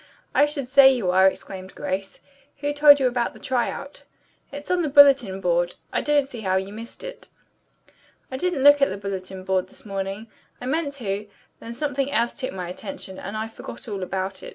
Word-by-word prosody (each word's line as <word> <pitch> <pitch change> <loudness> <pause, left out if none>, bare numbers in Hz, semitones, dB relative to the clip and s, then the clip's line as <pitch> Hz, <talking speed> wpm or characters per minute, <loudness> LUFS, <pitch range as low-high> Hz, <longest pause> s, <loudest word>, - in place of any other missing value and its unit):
"I 290 - +5
should 285 -3 -4
say 270 +1 +7
you 225 -9 0
are!" 190 +1 +6
exclaimed 190 0 -5
Grace. 190 +1 -4 0.4
"Who 290 0 -1
told 290 0 +7
you 265 - +1
about 245 -1 0
the - - -13
try 250 -2 0
out?" 280 +1 -8 0.5
"It's 285 +3 -7
on 360 -1 +2
the 310 - -1
bulletin 275 -9 +6
board. 175 -1 +1 0.2
I - - +1
don't 290 -2 +2
see 240 -4 -8
how 190 -2 0
you 190 +1 -2
missed 230 +2 -9
it." - - -8 1.0
"I 260 - -3
didn't 340 -3 -1
look 290 0 +7
at 275 - +4
the 190 - -4
bulletin 190 -1 -6
board 190 -1 0
this - - -8
morning. 195 +1 -4 0.3
I - - -7
meant 290 +2 -1
to, 210 -5 -4 0.3
then 230 +1 -8
something 280 0 -2
else 235 -4 +1
took 260 -3 -4
my 185 -2 -5
attention, 190 0 -7
and 200 +3 -6
I 220 +1 -3
forgot 225 +3 -10
all 200 -3 -4
about 190 +1 -3
it." - - -8
230 Hz, 205 wpm, -24 LUFS, 190-280 Hz, 1.0 s, say